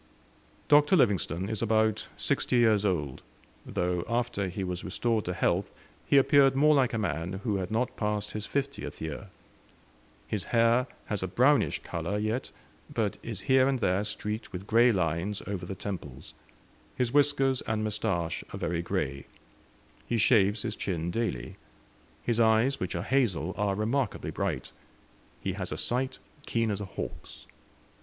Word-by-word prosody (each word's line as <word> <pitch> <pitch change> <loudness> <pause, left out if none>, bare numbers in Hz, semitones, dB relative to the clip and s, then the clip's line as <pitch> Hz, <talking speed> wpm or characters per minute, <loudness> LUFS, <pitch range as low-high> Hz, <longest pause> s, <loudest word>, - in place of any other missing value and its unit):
Dr. 150 +4 +6
Livingstone 100 - +2
is 110 -1 -3
about 110 -1 +2
sixty - - 0
years 110 -4 +4
old, 75 -8 -2 0.5
though 90 -1 -1
after 115 -4 0
he 95 +2 -4
was 90 -1 -4
restored 110 +3 0
to 90 - -2
health 90 +3 +1 0.4
he 140 - +5
appeared 135 0 +5
more 150 +3 +5
like 135 -4 +3
a - - 0
man 90 -4 -2
who 105 -4 0
had 95 -1 -3
not 115 +3 -1
passed 105 -1 -1
his 105 0 -5
fiftieth 140 - -3
year. 80 +6 -5 1.0
His 105 -4 -3
hair 115 +2 +3 0.2
has 105 -3 -2
a 95 - -1
brownish 130 +10 +3
colour 85 +5 -3
yet, 110 +4 -1 0.4
but - - -1
is - - -5
here 130 0 +4
and 135 -1 +1
there 100 -4 +1
streaked 105 +1 -4
with 95 0 -6
grey 115 +3 +5
lines 90 +1 -1
over 95 -3 -4
the 95 - -5
temples; 85 -9 -6 0.6
his 125 -1 -1
whiskers 140 -2 +3
and 110 -1 0
moustache 85 -6 -1
are - - -5
very 85 0 -1
grey. 75 -7 -3 0.8
He 120 - 0
shaves 105 -2 +4
his 110 -3 -3
chin 85 -3 -2
daily. 110 - -3 0.7
His 120 -1 0
eyes, 115 +4 +4
which 90 0 -3
are 85 - -2
hazel, 95 - +1
are 100 -1 0
remarkably 115 +4 -1
bright; - - -3 0.7
he - - -2
has - - -4
a - - -3
sight 130 +2 0 0.3
keen 115 -2 +1
as 100 0 -3
a - - -3
hawk's. 95 - -8
105 Hz, 160 wpm, -29 LUFS, 95-120 Hz, 1.0 s, Dr